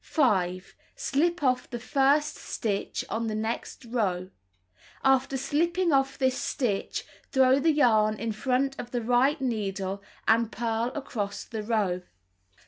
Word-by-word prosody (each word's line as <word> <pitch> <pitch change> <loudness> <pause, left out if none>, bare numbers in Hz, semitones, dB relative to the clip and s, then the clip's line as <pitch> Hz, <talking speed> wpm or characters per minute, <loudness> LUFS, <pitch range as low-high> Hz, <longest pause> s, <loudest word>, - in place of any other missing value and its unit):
5. 185 - +1 0.2
Slip 345 - 0
off 255 -2 +1
the 240 - -4
first 280 +4 +2
stitch 205 -3 -3
on 225 +1 -2
the 215 - -2
next 220 +3 -4
row. 190 -6 -1 0.7
After 270 0 +3
slipping 340 +6 +1
off 270 0 +2
this 260 -2 +2
stitch, 220 -9 -2 0.3
throw 265 0 +5
the 320 +3 +3
yarn 215 -7 +3
in 230 0 -2
front 260 +5 0
of 240 - -5
the 245 -1 -2
right 250 +6 +3
needle 200 -6 -2 0.3
and 230 0 +3
purl 230 0 -1
across 210 -8 -4
the 220 -2 -5
row. 210 -5 0
245 Hz, 135 wpm, -27 LUFS, 215-270 Hz, 0.7 s, throw